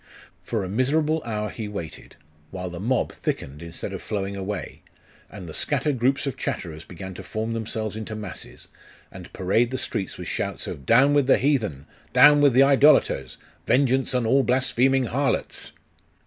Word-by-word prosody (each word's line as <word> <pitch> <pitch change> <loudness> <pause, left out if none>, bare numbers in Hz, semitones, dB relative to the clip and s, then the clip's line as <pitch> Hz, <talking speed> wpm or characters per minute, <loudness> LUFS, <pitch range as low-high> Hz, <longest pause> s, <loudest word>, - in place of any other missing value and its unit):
For 110 -4 -2
a - - -4
miserable 150 +9 +1
hour 105 -2 -3
he 110 -3 -6
waited, 100 -6 -8 0.3
while 90 0 -6
the 85 - -7
mob 120 +7 0
thickened 70 +3 -4
instead 85 0 -6
of - - -6
flowing 100 -1 -3
away, 100 0 -5 0.5
and 95 -5 -9
the 80 - -8
scattered 145 - 0
groups 135 +4 +1
of 140 - -3
chatterers 80 -2 -4
began 95 +2 -9
to - - -8
form 110 +1 -3
themselves 110 -1 -4
into 110 0 -6
masses, 105 -6 -9 0.4
and - - -11
parade 105 +6 +1
the 130 - -3
streets 95 - -3
with - - -7
shouts - - -3
of 70 - -7
'Down 135 +5 +5
with 145 -3 +3
the - - +5
heathen!' 110 - 0 0.3
'Down 145 0 +7
with 140 -3 +5
the 130 +3 +6
idolaters!' 135 - +4 0.3
'Vengeance 130 0 +2
on 125 -2 +1
all 135 +5 +4
blaspheming 130 +1 +2
harlots! 135 +4 -2
115 Hz, 170 wpm, -24 LUFS, 95-135 Hz, 0.5 s, Down